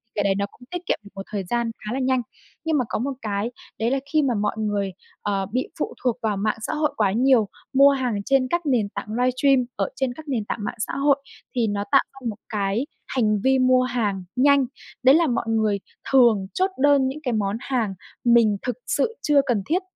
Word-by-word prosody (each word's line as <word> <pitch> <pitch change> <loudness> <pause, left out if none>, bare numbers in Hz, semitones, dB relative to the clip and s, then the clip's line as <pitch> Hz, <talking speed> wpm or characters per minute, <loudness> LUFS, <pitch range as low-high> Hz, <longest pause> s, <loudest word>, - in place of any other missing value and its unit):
cái 205 - +1
đấy 195 -1 +2
nó 200 0 0
cũng - - -23
tiết 355 0 -5
kiệm - - 0
được 200 - -13
một 195 - -5
thời 200 -2 -2
gian 235 +4 -1
khá 225 - -3
là 270 - -1
nhanh. 260 -1 +2 0.4
Nhưng 320 -2 +1
mà 250 - +1
có - - -1
một 275 +3 -2
cái 210 +2 -2 0.3
đấy 230 +3 +1
là 270 - +1
khi 310 - +5
mà 260 -4 +1
mọi 205 +2 0
người, 205 -3 -1 0.3
ờ, 195 -2 -1
bị 255 +2 -1
phụ - - -2
thuộc 245 -2 +1
vào 210 -3 0
mạng 215 +2 0
xã - - -3
hội 300 -1 0
quá 200 -3 +3
nhiều, 240 -1 +4 0.3
mua 275 +1 +7
hàng 255 -5 -1
trên 270 -2 +3
các 345 -2 -1
nền 235 -7 +1
tảng - - -6
livestream 255 +1 +3
ở - - -1
trên 265 -2 -1
các 315 +2 -12
nền 235 -7 -1
tảng - - -3
mạng 240 - -3
xã - - -2
hội 280 0 +4 0.4
thì 235 -3 +2
nó 205 0 -1
tạo 275 - +6
ra 270 - -13
một 210 - -5
cái 210 +4 -1 0.2
hành 215 -5 +1
vi 265 0 +4
mua 255 0 +4
hàng 215 -7 -1
nhanh, 280 +1 +4 0.4
đấy 265 +3 +7
là 330 -1 +4
mọi 240 - 0
người 215 -3 +1 0.3
thường 235 -7 +5
chốt 380 +1 +1
đơn 285 -2 +5
những 275 +3 -4
cái 250 -3 -1
món 205 0 0
hàng 235 -7 -1 0.3
mình 230 -4 +4
thực 250 - -2
sự 455 -1 0
chưa 290 -2 +4
cần 220 -6 0
thiết. 360 +4 +1
245 Hz, 230 wpm, -23 LUFS, 210-270 Hz, 0.4 s, mua